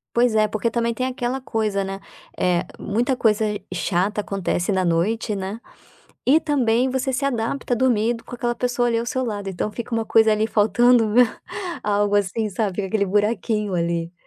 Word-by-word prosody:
Pois 240 Hz, -2 st, +3 dB
é, 215 Hz, 0 st, +4 dB
porque 220 Hz, +2 st, -1 dB
também 235 Hz, 0 st, 0 dB
tem 255 Hz, +2 st, -2 dB
aquela 255 Hz, 0 st, -3 dB
coisa, 215 Hz, -5 st, -1 dB
né, 195 Hz, 0 st, -5 dB, 0.4 s
eh, 180 Hz, -1 st, +1 dB, 0.2 s
muita 245 Hz, +6 st, 0 dB
coisa 220 Hz, -2 st, +2 dB, 0.3 s
chata 190 Hz, +4 st, 0 dB
acontece 195 Hz, -1 st, -2 dB
na 185 Hz, -1 st, +1 dB
noite, 205 Hz, +6 st, 0 dB
né. 195 Hz, +3 st, -5 dB, 0.7 s
E 290 Hz, +5 st, +5 dB
também, 255 Hz, -5 st, +1 dB
você 265 Hz, 0 st, -1 dB
se 275 Hz, +2 st, -1 dB
adapta 245 Hz, 0 st, -1 dB
dormindo 235 Hz, -1 st, +1 dB
com 245 Hz, -, -9 dB
aquela 240 Hz, -1 st, -1 dB
pessoa 245 Hz, 0 st, 0 dB
ali 230 Hz, -1 st, +1 dB
ao 235 Hz, -, -3 dB
seu 260 Hz, +1 st, -1 dB
lado, 205 Hz, -4 st, -4 dB
então 195 Hz, +3 st, -3 dB
fica 235 Hz, +2 st, -7 dB
uma 225 Hz, -1 st, 0 dB
coisa, 220 Hz, 0 st, +4 dB
ali, 215 Hz, +1 st, +2 dB
faltando, 225 Hz, +2 st, +4 dB
meu 245 Hz, +4 st, +6 dB, 0.6 s
algo, 205 Hz, 0 st, +1 dB
assim, 205 Hz, +2 st, 0 dB
sabe, 195 Hz, -1 st, -2 dB
fica 200 Hz, -2 st, -1 dB
aquele 200 Hz, -1 st, +1 dB
buraquinho 210 Hz, 0 st, 0 dB
ali. 170 Hz, 0 st, -1 dB
220 Hz, 180 wpm, -22 LUFS, 200-240 Hz, 0.7 s, meu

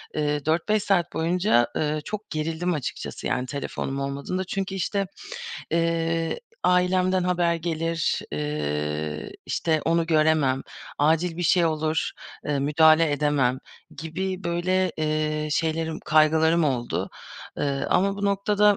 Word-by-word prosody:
eee, 150 Hz, -1 st, 0 dB
4-5 180 Hz, +6 st, +1 dB
saat 175 Hz, -3 st, +1 dB
boyunca, 165 Hz, -, +2 dB
ııı, 150 Hz, 0 st, 0 dB
çok 210 Hz, 0 st, -5 dB
gerildim 165 Hz, +3 st, -1 dB
açıkçası 145 Hz, -5 st, -4 dB
yani 125 Hz, -, -1 dB
telefonum 135 Hz, 0 st, -4 dB
olmadığında. 140 Hz, +7 st, -3 dB
Çünkü, 195 Hz, +1 st, -3 dB
işte, 195 Hz, +1 st, -1 dB, 0.7 s
eee, 165 Hz, -, 0 dB, 0.2 s
ailemden 185 Hz, +1 st, +3 dB
haber 175 Hz, -2 st, +2 dB
gelir, 165 Hz, 0 st, -1 dB
eee, 75 Hz, +1 st, -2 dB
işte, 160 Hz, -2 st, 0 dB
onu 165 Hz, 0 st, +2 dB
göremem, 155 Hz, -4 st, +3 dB, 0.4 s
acil 165 Hz, +3 st, +2 dB
bir 175 Hz, -, -2 dB
şey 175 Hz, +1 st, +4 dB
olur, 155 Hz, 0 st, 0 dB, 0.3 s
eee, 145 Hz, -1 st, 0 dB
müdahale 155 Hz, +2 st, +5 dB
edemem 140 Hz, -3 st, +1 dB, 0.4 s
gibi 185 Hz, +3 st, -4 dB
böyle, 180 Hz, +1 st, +1 dB
eee, 155 Hz, 0 st, -1 dB
şeylerim, 160 Hz, +1 st, -1 dB
kaygılarım 160 Hz, +2 st, +4 dB
oldu. 125 Hz, -4 st, -1 dB, 0.5 s
Iıı, 140 Hz, -1 st, -1 dB
ama 195 Hz, +2 st, +2 dB
bu 200 Hz, -, -3 dB
noktada, 205 Hz, +1 st, +3 dB
160 Hz, 120 wpm, -25 LUFS, 150-180 Hz, 0.7 s, müdahale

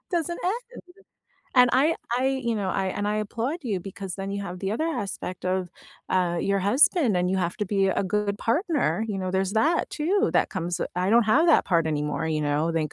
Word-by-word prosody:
Doesn't 345 Hz, -1 st, -1 dB
end, 480 Hz, +6 st, -3 dB, 0.7 s
and 250 Hz, -1 st, +6 dB
I 285 Hz, +6 st, +3 dB, 0.2 s
I 260 Hz, -, +1 dB, 0.2 s
you 235 Hz, -1 st, 0 dB
know, 200 Hz, -3 st, -2 dB
I 195 Hz, -, -1 dB
and 205 Hz, +2 st, -2 dB
I 210 Hz, -, 0 dB
applaud 235 Hz, -, -2 dB
you, 205 Hz, -7 st, -2 dB
because 195 Hz, -1 st, -7 dB
then 195 Hz, 0 st, -5 dB
you 200 Hz, 0 st, -3 dB
have 180 Hz, -1 st, -6 dB
the 195 Hz, 0 st, -2 dB
other 310 Hz, +9 st, -1 dB
aspect 195 Hz, -, -4 dB
of, 185 Hz, -1 st, -1 dB, 0.4 s
uh, 175 Hz, -2 st, +1 dB
your 200 Hz, 0 st, +1 dB
husband, 250 Hz, -, +3 dB
and 180 Hz, +1 st, +1 dB
you 190 Hz, -, +1 dB
have 175 Hz, -1 st, -1 dB
to 210 Hz, -, 0 dB
be 195 Hz, -1 st, +1 dB
a 190 Hz, -, 0 dB
good 205 Hz, +1 st, -1 dB
partner, 295 Hz, -, 0 dB
you 195 Hz, -2 st, -2 dB
know, 185 Hz, -1 st, -2 dB
there's 190 Hz, +1 st, 0 dB
that, 305 Hz, +10 st, +1 dB
too, 390 Hz, +8 st, +1 dB
that -, -, +2 dB
comes 175 Hz, -2 st, -3 dB
w -, -, -2 dB
I 185 Hz, +2 st, +1 dB
don't 235 Hz, 0 st, +5 dB
have 290 Hz, +11 st, +4 dB
that 330 Hz, -, +5 dB
partner 165 Hz, -3 st, +1 dB
anymore, 150 Hz, 0 st, -2 dB
you 155 Hz, -1 st, 0 dB
know, 150 Hz, +3 st, 0 dB
thank 155 Hz, -2 st, -1 dB
200 Hz, 225 wpm, -25 LUFS, 185-250 Hz, 0.7 s, and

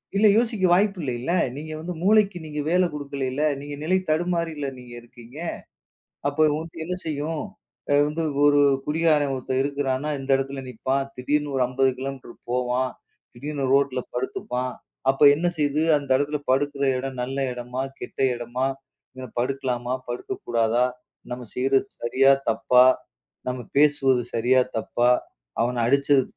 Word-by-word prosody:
இல்ல 210 Hz, +2 st, +5 dB
யோசிக்க 225 Hz, -4 st, 0 dB
வாய்ப்பு 195 Hz, +2 st, +3 dB
இல்லல்ல. 130 Hz, +3 st, -2 dB, 0.2 s
நீங்க 155 Hz, +2 st, -7 dB
வந்து 170 Hz, +3 st, -5 dB
மூளைக்கு 200 Hz, -1 st, +4 dB
நீங்க 150 Hz, -1 st, -5 dB
வேலை 180 Hz, +2 st, +4 dB
குடுக்கல. 140 Hz, -1 st, -3 dB, 0.2 s
நீங்க 145 Hz, +1 st, -7 dB
நிலை 185 Hz, +4 st, +2 dB
தடுமாறல் 165 Hz, -2 st, 0 dB
நீங்க 125 Hz, -1 st, -12 dB
இருக்கீங்க. 120 Hz, +3 st, -15 dB, 0.9 s
அப்போ 145 Hz, +2 st, -3 dB
உங்களுக்கு 160 Hz, +2 st, -5 dB
என்ன 180 Hz, +2 st, -3 dB
செய்யும்? 155 Hz, +1 st, -2 dB, 0.6 s
வந்து 155 Hz, +2 st, -2 dB, 0.2 s
ஒரு 145 Hz, 0 st, +5 dB, 0.3 s
குடிகாரன் 150 Hz, -2 st, +2 dB
ஒருத்தர் 130 Hz, 0 st, -2 dB
இருக்கிறானா, 140 Hz, 0 st, -1 dB
எந்த 135 Hz, +1 st, -6 dB
இடத்துல 135 Hz, 0 st, -4 dB
நிப்பான்? 135 Hz, +3 st, -2 dB
திடீர்னு 145 Hz, +3 st, -1 dB
ஒரு 130 Hz, -, +2 dB
50கிலோமீட்டர் 130 Hz, 0 st, -2 dB, 0.2 s
போவான். 125 Hz, +1 st, 0 dB, 0.4 s
திடீர்னு 140 Hz, +2 st, -3 dB
ரோட்ல 140 Hz, -2 st, +2 dB
படுத்துப்பான். 130 Hz, -, -3 dB, 0.4 s
அப்ப 135 Hz, -, -4 dB
என்ன 165 Hz, +4 st, -1 dB
செய்து 150 Hz, +1 st, +1 dB
அந்த 140 Hz, -1 st, -4 dB
இடத்துல 145 Hz, +1 st, -1 dB
படுக்குற 140 Hz, +1 st, +1 dB
இடம் 130 Hz, -1 st, -4 dB
நல்ல 135 Hz, +2 st, -4 dB
இடமா? 125 Hz, +1 st, -4 dB, 0.2 s
கெட்ட -, -, -8 dB, 0.2 s
இடமா? 120 Hz, +2 st, -2 dB, 0.7 s
படுக்கலாமா, 125 Hz, -1 st, -1 dB, 0.2 s
படுக்கக் 120 Hz, 0 st, -5 dB
கூடாதா? 115 Hz, +1 st, +2 dB, 0.4 s
நாம 125 Hz, 0 st, -5 dB
செய்யறது 135 Hz, +5 st, +2 dB, 0.2 s
சரியா 135 Hz, +3 st, +4 dB, 0.2 s
தப்பா? 125 Hz, 0 st, +5 dB, 0.6 s
நாம 125 Hz, -1 st, -3 dB
பேசுவது 140 Hz, -3 st, +4 dB
சரியா 125 Hz, +3 st, +4 dB, 0.2 s
தப்பா, 120 Hz, +2 st, +1 dB, 0.5 s
அவனை 125 Hz, +1 st, -1 dB
அடிச்சது 140 Hz, +1 st, +4 dB
135 Hz, 130 wpm, -24 LUFS, 125-150 Hz, 0.9 s, இல்ல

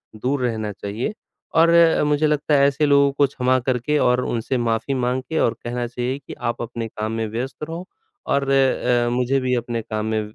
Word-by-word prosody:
दूर 130 Hz, +5 st, -1 dB
रहना 110 Hz, -3 st, -2 dB
चाहिए 105 Hz, -, -4 dB, 0.4 s
और 165 Hz, +1 st, +6 dB
अ, 170 Hz, -2 st, +5 dB
मुझे 150 Hz, +1 st, +2 dB
लगता 150 Hz, 0 st, 0 dB
है 140 Hz, -1 st, +5 dB
ऐसे 140 Hz, +2 st, +1 dB
लोगों 140 Hz, -1 st, +4 dB
को 140 Hz, +1 st, +3 dB
क्षमा 130 Hz, -1 st, +1 dB
करके 130 Hz, +4 st, 0 dB
और 125 Hz, -1 st, +3 dB
उनसे 120 Hz, +3 st, -1 dB
माफ़ी 115 Hz, +4 st, 0 dB
माँग 125 Hz, 0 st, 0 dB
के 160 Hz, -, 0 dB
और 115 Hz, -, +2 dB
कहना 120 Hz, 0 st, -3 dB
चाहिए 125 Hz, +3 st, -3 dB
कि -, -, -7 dB, 0.2 s
आप -, -, -10 dB
अपने 115 Hz, -1 st, -4 dB
काम 110 Hz, 0 st, -4 dB
में 115 Hz, 0 st, -2 dB
व्यस्त 120 Hz, +7 st, -5 dB
रहो 165 Hz, +3 st, -5 dB, 0.4 s
और 140 Hz, -1 st, +1 dB
अ, 125 Hz, -3 st, +2 dB
मुझे 125 Hz, +2 st, +1 dB
भी 130 Hz, -1 st, 0 dB
अपने 120 Hz, -1 st, -3 dB
काम 110 Hz, 0 st, -4 dB
में 110 Hz, 0 st, 0 dB
125 Hz, 205 wpm, -22 LUFS, 115-140 Hz, 0.4 s, और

